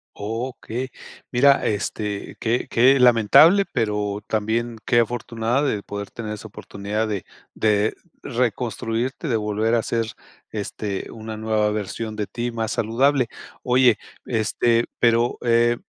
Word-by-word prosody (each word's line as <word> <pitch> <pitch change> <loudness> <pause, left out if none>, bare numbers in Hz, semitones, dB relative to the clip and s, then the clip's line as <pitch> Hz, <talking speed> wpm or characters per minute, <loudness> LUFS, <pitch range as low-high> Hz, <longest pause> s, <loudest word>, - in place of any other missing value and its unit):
Okey. 120 +3 -4 0.4
Mira, 135 +3 +4
este, 105 -1 -3
qué 115 +2 0
qué 130 +3 +5
lamentable, 125 - +6
pero 105 -3 -1
también 110 +2 -1
qué 120 -2 +4
afortunada 120 +2 0
de 105 -8 0
poder 100 -1 -6
tener 110 -2 -5
esa 105 +1 -9
oportunidad 105 +1 -4
de 100 -3 -3 0.3
de 105 0 +2 0.3
reconstruirte, 120 - -2
de 115 -4 +1
volver 105 +2 0
a 115 - +4
hacer 115 0 -1 0.5
este, 105 -1 -4
una 110 0 -7
nueva 110 -1 0
versión 110 +1 -4
de 105 -2 -3
ti 120 0 -3
más 115 -1 -2
saludable. 125 +3 +2 0.4
Oye 125 -2 +4 0.3
este 115 +1 +1
pero 115 0 +2
eh, 120 0 +3
115 Hz, 130 wpm, -23 LUFS, 105-120 Hz, 0.5 s, lamentable